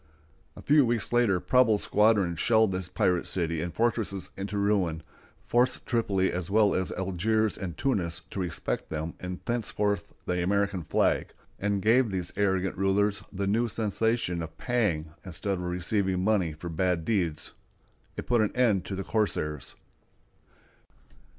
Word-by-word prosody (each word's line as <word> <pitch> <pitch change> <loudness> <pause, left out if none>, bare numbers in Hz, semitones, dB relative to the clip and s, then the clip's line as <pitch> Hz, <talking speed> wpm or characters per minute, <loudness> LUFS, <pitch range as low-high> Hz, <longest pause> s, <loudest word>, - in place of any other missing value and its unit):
A - - -11
few 145 0 +5
weeks 120 -2 -1
later 115 -7 +3
Preble's 115 -1 +3
squadron 105 -5 +3
shelled 110 +4 +3
the 90 -1 -4
pirate 90 -2 +1
city 85 -3 -1
and 85 +1 -3
fortresses 105 -2 -1
into 100 +1 -4
ruin, 95 -6 +1 0.4
forced 125 +1 +1
Tripoli 100 -6 +1
as 90 -1 -3
well 105 0 +4
as 95 -1 -1
Algiers 100 +4 0
and 85 -6 -6
Tunis 90 -10 -1
to - - -5
respect 90 -3 -3
them 80 +2 -4
and 90 0 -6
thenceforth 105 -5 -1
the 90 0 -1
American 100 +1 0
flag, 80 - +1 0.3
and 100 -1 -1
gave 115 +2 +4
these 90 -3 -4
arrogant 95 -2 0
rulers 100 +1 +1
the 100 0 -3
new 115 +5 +1
sensation 110 -4 0
of 80 0 -8
paying 95 -11 0
instead 95 +2 -3
of 90 - -3
receiving 90 +1 0
money 95 -6 +1
for 75 +3 -8
bad 85 0 0
deeds. 85 -9 -1 0.6
It - - -4
put 120 -2 +3
an 105 - -1
end 110 -7 +2
to 100 - -4
the 95 - -4
corsairs. 75 -9 -2
95 Hz, 150 wpm, -28 LUFS, 90-110 Hz, 0.6 s, few